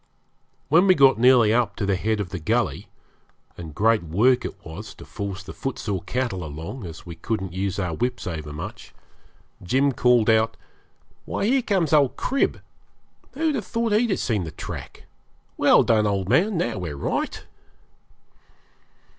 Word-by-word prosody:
When 170 Hz, +6 st, +4 dB
we 185 Hz, -, +6 dB
got 135 Hz, -5 st, +5 dB
nearly 120 Hz, -3 st, +5 dB
up 120 Hz, 0 st, +1 dB
to 105 Hz, -, -2 dB
the 100 Hz, -1 st, +1 dB
head 110 Hz, +3 st, -1 dB
of 100 Hz, -4 st, -3 dB
the 95 Hz, 0 st, -5 dB
gully 80 Hz, -, -1 dB, 0.7 s
and 80 Hz, -3 st, -9 dB
great 110 Hz, +1 st, +3 dB
work 105 Hz, +11 st, +2 dB
it -, -, -8 dB
was 85 Hz, +7 st, -9 dB
to -, -, -12 dB
force 100 Hz, -2 st, -6 dB
the -, -, -9 dB
footsore 105 Hz, -8 st, -4 dB
cattle 120 Hz, -8 st, -3 dB
along, 80 Hz, -, -7 dB
as 85 Hz, +2 st, -10 dB
we 85 Hz, -, -7 dB
couldn't 95 Hz, +2 st, -4 dB
use 95 Hz, +1 st, -2 dB
our 90 Hz, -4 st, -2 dB
whips 125 Hz, +9 st, -2 dB
overmuch 75 Hz, -3 st, -7 dB, 0.7 s
Jim 135 Hz, +10 st, +2 dB
called 125 Hz, -3 st, +3 dB
out 110 Hz, 0 st, +3 dB, 0.7 s
'Why, -, -, -2 dB
here 260 Hz, +4 st, +3 dB
comes 185 Hz, -, 0 dB
old 145 Hz, -4 st, +4 dB
Crib. 275 Hz, -, 0 dB, 0.7 s
Who'd 315 Hz, +2 st, 0 dB
have 220 Hz, -9 st, -3 dB
thought 230 Hz, -1 st, -1 dB
he'd 225 Hz, +3 st, +2 dB
have 195 Hz, -, +1 dB
seen 105 Hz, -6 st, -1 dB
the 80 Hz, -, -5 dB
track? -, -, -8 dB, 0.5 s
Well -, -, +5 dB
done, 110 Hz, -2 st, +3 dB
old 100 Hz, -2 st, -1 dB
man. 190 Hz, -, +2 dB
Now 120 Hz, -, -1 dB
we're 80 Hz, -6 st, -5 dB
right.' -, -, -3 dB
110 Hz, 165 wpm, -24 LUFS, 90-135 Hz, 0.7 s, we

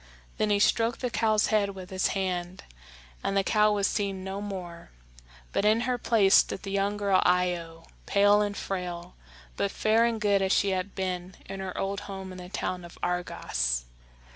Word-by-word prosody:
Then 215 Hz, -, +2 dB
he 205 Hz, -, +3 dB
stroked 230 Hz, +3 st, +2 dB
the 250 Hz, -2 st, -1 dB
cow's 215 Hz, -2 st, +2 dB
head 200 Hz, -2 st, +2 dB
with 185 Hz, 0 st, -9 dB
his 185 Hz, 0 st, +1 dB
hand, 180 Hz, -1 st, -3 dB, 0.6 s
and 195 Hz, -, 0 dB
the 195 Hz, -, +3 dB
cow 210 Hz, +1 st, +3 dB
was 205 Hz, -1 st, +1 dB
seen 195 Hz, -2 st, -1 dB
no 190 Hz, +1 st, -4 dB
more; 180 Hz, -4 st, -7 dB, 0.6 s
but -, -, 0 dB
in 215 Hz, +2 st, +4 dB
her 245 Hz, 0 st, -1 dB
place 210 Hz, -4 st, +3 dB
stood -, -, +4 dB
the 195 Hz, -, -5 dB
young 200 Hz, +1 st, 0 dB
girl 200 Hz, -2 st, +3 dB
Io, 175 Hz, -2 st, 0 dB, 0.2 s
pale 205 Hz, +1 st, +5 dB
and 205 Hz, -1 st, -2 dB
frail, 180 Hz, -2 st, -4 dB, 0.4 s
but 100 Hz, -, +1 dB
fair 220 Hz, +2 st, +2 dB
and 230 Hz, -1 st, 0 dB
good 205 Hz, -2 st, +2 dB
as 190 Hz, -1 st, +1 dB
she 200 Hz, -, +3 dB
had 190 Hz, +1 st, -2 dB
been 185 Hz, -1 st, -3 dB
in 195 Hz, 0 st, -7 dB
her 190 Hz, -1 st, -5 dB
old 195 Hz, +1 st, -2 dB
home 190 Hz, -1 st, -6 dB
in 185 Hz, -, -9 dB
the 180 Hz, 0 st, -9 dB
town 180 Hz, -1 st, -3 dB
of 170 Hz, -, -12 dB
Argos. 65 Hz, -, -1 dB
195 Hz, 190 wpm, -28 LUFS, 180-205 Hz, 0.6 s, pale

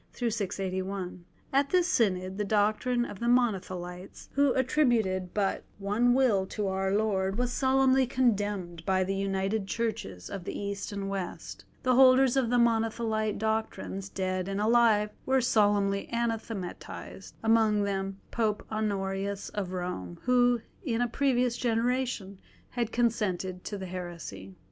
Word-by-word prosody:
At 275 Hz, +1 st, +3 dB
this 360 Hz, +1 st, +3 dB
Synod, 190 Hz, -, +1 dB
the -, -, +1 dB
doctrine 215 Hz, +4 st, +1 dB
of 200 Hz, -, -8 dB
the 235 Hz, -, -2 dB
Monothelites, 185 Hz, -7 st, -1 dB
who 280 Hz, -1 st, +3 dB
attributed 235 Hz, -9 st, +1 dB
but 200 Hz, -2 st, 0 dB
one 210 Hz, +5 st, +2 dB
will 220 Hz, -8 st, +3 dB
to 210 Hz, 0 st, -3 dB
Our 190 Hz, 0 st, 0 dB
Lord, 195 Hz, -2 st, +1 dB
was 245 Hz, 0 st, 0 dB
solemnly 265 Hz, -1 st, +3 dB
condemned 205 Hz, -9 st, 0 dB
by 185 Hz, +1 st, +2 dB
the 190 Hz, +1 st, -2 dB
united 195 Hz, +1 st, -1 dB
Churches 215 Hz, -, -3 dB
of 195 Hz, -, -6 dB
the -, -, -5 dB
East 200 Hz, 0 st, -4 dB
and 200 Hz, -1 st, -4 dB
West. 195 Hz, -2 st, -5 dB, 0.2 s
The 255 Hz, -, +3 dB
holders 260 Hz, 0 st, +6 dB
of 265 Hz, -3 st, +2 dB
Monothelite 225 Hz, -2 st, +1 dB
doctrines, 215 Hz, -3 st, -2 dB
dead 185 Hz, -1 st, -2 dB
and 195 Hz, 0 st, -2 dB
alive, 215 Hz, -1 st, +4 dB, 0.2 s
were 265 Hz, 0 st, +4 dB
solemnly 205 Hz, -4 st, +2 dB
anathematised, 225 Hz, -5 st, -4 dB
among 220 Hz, -2 st, +3 dB
them 195 Hz, -1 st, -2 dB
Pope 215 Hz, -2 st, 0 dB
Honorius 200 Hz, -2 st, -2 dB
of 195 Hz, -3 st, -4 dB
Rome, 175 Hz, -, -4 dB
who 245 Hz, -1 st, +3 dB, 0.2 s
in 240 Hz, -7 st, -1 dB
a 245 Hz, -, +2 dB
previous 250 Hz, -1 st, +1 dB
generation 235 Hz, -4 st, -1 dB, 0.3 s
had 235 Hz, -2 st, -2 dB
consented 190 Hz, -6 st, 0 dB
to 205 Hz, -, -4 dB
the 190 Hz, -, -6 dB
heresy. 170 Hz, -, -7 dB
210 Hz, 135 wpm, -29 LUFS, 195-240 Hz, 0.3 s, holders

